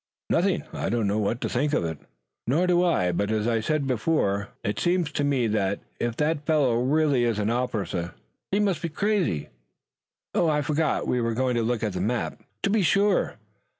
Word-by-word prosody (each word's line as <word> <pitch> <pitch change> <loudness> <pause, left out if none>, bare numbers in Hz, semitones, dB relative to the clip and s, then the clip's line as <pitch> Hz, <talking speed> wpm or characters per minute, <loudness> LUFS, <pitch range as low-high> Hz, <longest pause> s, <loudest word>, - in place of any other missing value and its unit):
"Nothing. - - +2
I - - -2
don't 115 -2 0
know 100 +2 +1
what 110 +3 0
to - - 0
think 150 +1 0
of 85 - +1
it." 80 -2 -4 0.5
"Nor 155 +9 +2
do 180 -1 +3
I, 90 - +2
but 100 +4 -1
as 110 0 0
I 115 -1 +2
said 150 +5 0
before, 110 -6 0
it 105 - -2
seems 175 -3 +1
to 145 - -1
me 140 -4 +1
that, 100 -3 0 0.2
if 120 -1 -2
that 150 0 0
fellow 140 -7 +3
really 140 -1 +2
is 115 -3 +1
an 105 +1 0
officer, 105 -8 -2 0.4
he 200 - +2
must 195 -6 +1
be 170 - -2
crazy. 185 - 0 0.8
Oh, 170 - +2
I 150 -1 +1
forgot, 155 +2 0
we 125 - +1
were 115 -1 -1
going 130 +1 +1
to 120 - +1
look 115 0 -1
at 105 -3 -1
the 90 - -3
map." 115 +5 -2 0.2
"To 195 - +2
be 215 0 +3
sure. 200 +2 +2
125 Hz, 205 wpm, -26 LUFS, 110-160 Hz, 0.8 s, do